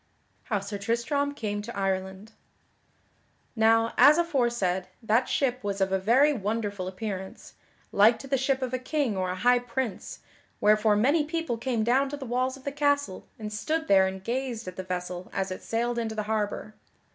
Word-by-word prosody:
[Sidenote: - - -41
How 215 -5 0
Sir 205 0 -4
Tristram 260 +7 -1
came 205 -5 -3
to 235 +2 -8
Ireland] 190 +2 -2 1.2
Now, 225 0 +3
as 290 +5 +8
aforesaid, 240 - 0 0.2
that 225 +3 +2
ship 255 -3 0
was 200 -1 -2
of 190 0 +1
a 190 - +2
very 255 +10 +4
wonderful 205 -4 -3
appearance, 190 -1 -6 0.4
like 220 +3 +5
to 275 - -10
the 270 - +1
ship 265 0 0
of 255 -1 -3
a 255 - 0
king 255 -3 -1
or 185 -1 -1
a 180 - -2
high 245 +6 +4
prince, 245 -2 -4 0.4
wherefore 215 0 +4
many 280 +9 +3
people 325 -4 -2
came 230 -1 -1
down 265 +4 +2
to 290 - -5
the 275 - -7
walls 255 +2 -1
of 265 - -17
the 280 - -3
castle 285 -7 0
and 215 -1 -6
stood 315 +10 -2
there 190 -1 +5
and 190 0 -6
gazed 240 -1 -3
at 185 - -6
the - - -4
vessel 180 0 -5
as 195 -1 -2
it 185 - -5
sailed 235 +1 -1
into 220 -1 -3
the 215 - -2
harbor. 215 0 -2
225 Hz, 190 wpm, -27 LUFS, 200-260 Hz, 1.2 s, as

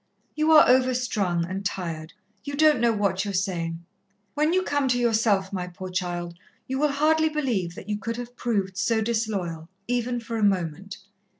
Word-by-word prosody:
"You 310 +1 +2
are 305 - +8
overstrung, 245 -9 +2
and 190 +3 -5
tired; 165 -5 -4 0.3
you 285 0 -5
don't 305 -2 +5
know 235 0 +3
what 200 -3 0
you 205 - -4
are - - -4
saying. 170 -3 -2 0.5
When 300 +2 +2
you 370 +1 +2
come 285 -4 0
to 245 -1 +2
yourself, 220 -5 +2
my 180 -2 -3
poor 185 +1 -8
child, 175 -2 -3 0.3
you 265 +1 -2
will 295 -1 +2
hardly 315 +2 +3
believe 235 - -1
that 190 - -10
you 210 0 -2
could 230 +1 -4
have 245 0 -7
proved 200 -7 -1
so 220 +3 +1
disloyal, 200 -8 -2 0.2
even 245 0 -1
for 230 0 -5
a 220 - -1
moment." 190 0 0
215 Hz, 185 wpm, -25 LUFS, 185-250 Hz, 0.5 s, are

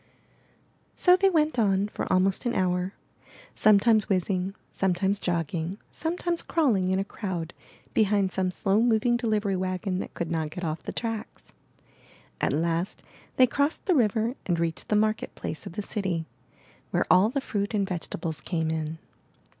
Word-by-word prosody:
So 360 -1 +6
they 390 +1 +4
went 310 -7 +2
on 200 -2 +2
for - - -4
almost 190 +5 +2
an 240 - -1
hour, 180 0 0 0.6
sometimes 215 +1 +4
whizzing, 190 0 0 0.2
sometimes 195 +1 0
jogging, 170 +1 -2
sometimes 340 +1 -1
crawling 225 - +1
in 190 - +2
a 195 - +1
crowd 180 -5 -5 0.4
behind 205 -3 +2
some 185 0 0
slow 195 +3 +1
moving 240 0 +3
delivery 215 -4 0
wagon 185 0 -2
that - - -6
could 170 -1 -3
not 160 -2 -1
get 180 +4 -7
off 160 -1 -2
the - - -5
tracks. 225 -2 -5 0.9
At - - +2
last 165 +5 -1 0.3
they 255 - +7
crossed 285 +5 0
the 375 - +3
river 230 -3 +2
and 175 -3 +1
reached 165 -1 -2
the 210 - +1
market 215 +1 0
place 155 - -5
of - - -8
the 210 - -4
city, 185 -6 -2 0.6
where - - +1
all 190 +4 +6
the 275 +4 -1
fruit 205 -5 -2
and 200 -2 +1
vegetables 165 -3 -4
came 160 -3 -1
in. 160 0 -3
195 Hz, 160 wpm, -27 LUFS, 180-220 Hz, 0.9 s, they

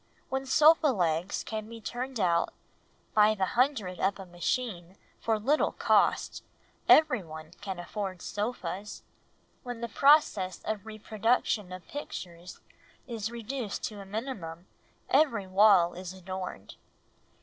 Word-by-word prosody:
When 265 0 -2
sofa 310 +3 +6
legs 175 - 0
can 215 0 -5
be 230 0 -9
turned 245 +2 -5
out 170 -3 +1 0.6
by 215 0 +5
the 195 -2 +1
hundred 235 -8 +1
by 190 +1 +2
a 195 - -8
machine 180 0 -3 0.2
for 225 -1 +1
little 275 +9 +1
cost, - - +2 0.5
everyone 170 - +3
can 195 -2 -4
afford 185 +1 -5
sofas; 205 -2 -4 0.6
when 245 -2 -7
the 235 - -2
process 225 - +3
of 215 -1 -3
reproduction 215 -2 0
of 185 -2 -9
pictures 180 - -8 0.4
is 225 -4 -4
reduced 235 -1 -5
to 210 -2 -9
a - - -10
minimum, 195 -7 -5 0.4
every 265 -8 +3
wall 190 -2 +5
is 180 0 -7
adorned. 185 - -7
210 Hz, 125 wpm, -29 LUFS, 185-240 Hz, 0.6 s, sofa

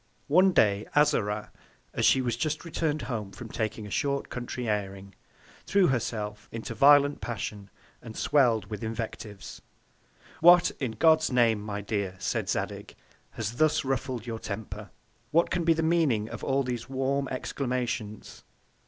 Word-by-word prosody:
One 185 +6 +5
Day 105 - +2
Azora, 110 -9 +2 0.4
as - - +2
she 130 - +4
was 120 -2 -1
just 155 +7 -2
return'd 155 -2 -1
home 110 -6 -4
from 115 +3 -9
taking 110 -1 -3
a 105 - -9
short 140 +4 -1
Country 120 0 -5
airing, 100 -2 -3 0.5
threw 195 -1 +4
herself 105 -4 -3
into 115 0 -5
a - - -14
violent 145 +2 +5
Passion, 105 -3 -5 0.3
and 115 -2 -10
swell'd 120 -8 +3
with 105 +2 -5
Invectives. 110 -2 -6 0.8
What, 175 +1 +7
in 130 -6 -2
God's 160 +2 +4
Name, 115 -4 +3
my 105 -1 -4
Dear, 100 -2 -3
said - - -2
Zadig, - - -3 0.4
has 115 +1 -4
thus 155 -1 +2
ruffled 130 -3 -2
your 115 -2 -5
Temper? 105 0 -6 0.4
What 170 +2 +2
can 175 - 0
be 165 0 +4
the 160 0 -1
Meaning 155 -10 +2
of - - -8
all 135 +1 +1
these 125 -2 -4
warm 135 +1 -1
Exclamations? 125 -5 -4
120 Hz, 155 wpm, -28 LUFS, 105-145 Hz, 0.8 s, What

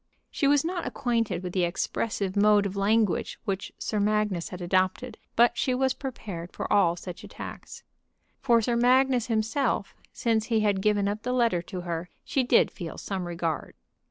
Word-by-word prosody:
She 280 - +1
was 290 +1 +4
not 350 0 -2
acquainted 230 -7 -1
with 180 -1 -5
the 185 - +1
expressive 190 +2 -2
mode 205 0 +5
of 200 0 -3
language 205 0 +1
which 195 -2 -3
Sir 215 - -2
Magnus 210 -4 0
had 180 - -7
adopted, 185 +7 0 0.2
but 240 +1 +5
she 250 +1 0
was 265 0 +2
prepared 195 -10 -6
for - - -3
all 180 -5 +4
such 175 0 -8
attacks. - - -9 0.6
For 235 -4 +3
Sir 240 +2 +1
Magnus 250 0 +3
himself, 225 0 0 0.2
since 225 -2 0
he 225 -2 +1
had 205 -2 +1
given 205 -1 +2
up 205 +1 -2
the 250 +2 -2
letter 235 -8 +2
to 185 -2 -4
her, 170 0 -4
she 270 - 0
did 245 -1 +4
feel 170 -4 -7
some 190 -3 -4
regard. 170 -2 -3
210 Hz, 175 wpm, -27 LUFS, 185-240 Hz, 0.6 s, mode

